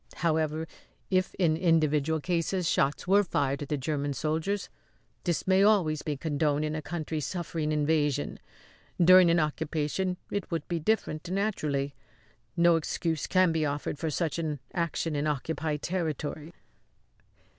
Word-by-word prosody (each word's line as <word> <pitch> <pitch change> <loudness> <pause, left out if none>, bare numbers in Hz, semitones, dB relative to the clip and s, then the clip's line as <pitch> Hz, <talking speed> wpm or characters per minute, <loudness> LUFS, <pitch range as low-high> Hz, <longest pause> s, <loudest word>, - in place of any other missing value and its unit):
However, 160 -1 0 0.4
if 185 -1 +1
in 165 -4 +2
individual 160 -2 +2
cases 175 +2 -1
shots 140 +3 +1
were 200 +2 +5
fired 140 -6 -1
at 145 - -5
the 150 - 0
German 145 +1 -2
soldiers, 160 +8 -1 0.6
this 175 -3 0
may 190 0 +4
always 190 -8 +3
be 150 -3 -3
condoned 150 0 0
in 155 - -2
a 155 - -3
country 155 0 -4
suffering 160 0 -3
invasion. 150 - 0 0.6
During 180 0 +7
an 170 0 +4
occupation 155 +4 -1
it 200 -3 -3
would 165 - -3
be 170 -1 -1
different, 170 -3 -1
naturally. 155 -9 -1 0.6
No 170 -1 +5
excuse 160 0 -2
can 185 -2 +4
be 160 -1 0
offered 145 0 -2
for 160 - -1
such 160 0 -1
an 155 -3 -2
action 165 -2 -1
in 145 +1 0
occupied 150 +1 -2
territory." 160 -3 -3
160 Hz, 145 wpm, -28 LUFS, 150-175 Hz, 0.6 s, During